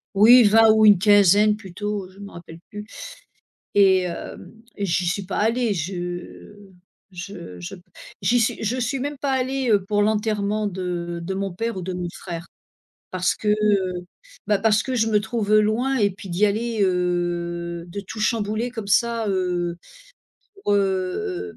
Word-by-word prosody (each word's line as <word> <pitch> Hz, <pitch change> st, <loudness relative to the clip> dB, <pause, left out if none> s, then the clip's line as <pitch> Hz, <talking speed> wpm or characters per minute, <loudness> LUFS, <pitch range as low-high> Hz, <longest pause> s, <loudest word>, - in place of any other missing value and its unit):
Oui, 235 Hz, +5 st, +8 dB
20 220 Hz, +1 st, +6 dB
ou 220 Hz, 0 st, +4 dB
une 205 Hz, -4 st, +7 dB
quinzaine 205 Hz, +1 st, +5 dB
plutôt, 205 Hz, 0 st, -5 dB
heu, -, -, -18 dB
je 190 Hz, -, -18 dB
m'en 200 Hz, 0 st, -10 dB
rappelle 170 Hz, -1 st, -11 dB
plus, 210 Hz, 0 st, -8 dB, 0.9 s
et 190 Hz, -2 st, +5 dB
hem, 175 Hz, -1 st, -7 dB, 0.2 s
et 200 Hz, -, -2 dB
j'y 180 Hz, 0 st, 0 dB
suis 195 Hz, +3 st, -1 dB
pas 195 Hz, -, -3 dB
allée, 230 Hz, 0 st, +1 dB
je 175 Hz, +3 st, -6 dB, 0.6 s
je 175 Hz, -, -9 dB
je 85 Hz, -, -7 dB
p 180 Hz, -, -18 dB, 0.4 s
j'y 245 Hz, +1 st, +3 dB
suis 225 Hz, -, -1 dB
je 225 Hz, +4 st, -1 dB
suis 255 Hz, +3 st, -1 dB
même 285 Hz, +2 st, -4 dB
pas 280 Hz, +1 st, -2 dB
allée, 260 Hz, -1 st, -1 dB
heu, 205 Hz, -3 st, +3 dB
pour 205 Hz, +1 st, +1 dB
l'enterrement 210 Hz, 0 st, 0 dB
de 175 Hz, -3 st, -4 dB
de 190 Hz, +3 st, -4 dB
mon 195 Hz, 0 st, -3 dB
père 230 Hz, +3 st, -3 dB
ou 185 Hz, -, -4 dB
de 185 Hz, +1 st, -4 dB
mon 180 Hz, -1 st, -4 dB
frère, 170 Hz, -1 st, -7 dB, 0.7 s
parce 185 Hz, 0 st, 0 dB
que, -, -, -9 dB
heu, 200 Hz, -4 st, +1 dB, 0.4 s
bah 205 Hz, -1 st, +3 dB
parce 220 Hz, 0 st, +2 dB
que 260 Hz, -, -4 dB
je 225 Hz, -2 st, +2 dB
me 210 Hz, -1 st, +3 dB
trouve 215 Hz, -1 st, -1 dB
loin 235 Hz, +6 st, 0 dB
et 205 Hz, -2 st, +3 dB
puis 195 Hz, +1 st, -11 dB
d'y 185 Hz, +5 st, +2 dB
aller 225 Hz, +2 st, -2 dB
heu 175 Hz, -2 st, -1 dB
de 200 Hz, +4 st, -6 dB
tout 200 Hz, +3 st, -9 dB
chambouler 215 Hz, +1 st, -1 dB
comme 225 Hz, -4 st, -6 dB
ça, 230 Hz, +1 st, +1 dB
heu, 180 Hz, -2 st, -1 dB, 0.9 s
pour, 205 Hz, -, +1 dB
heu 200 Hz, -, -2 dB
205 Hz, 175 wpm, -22 LUFS, 180-220 Hz, 0.9 s, Oui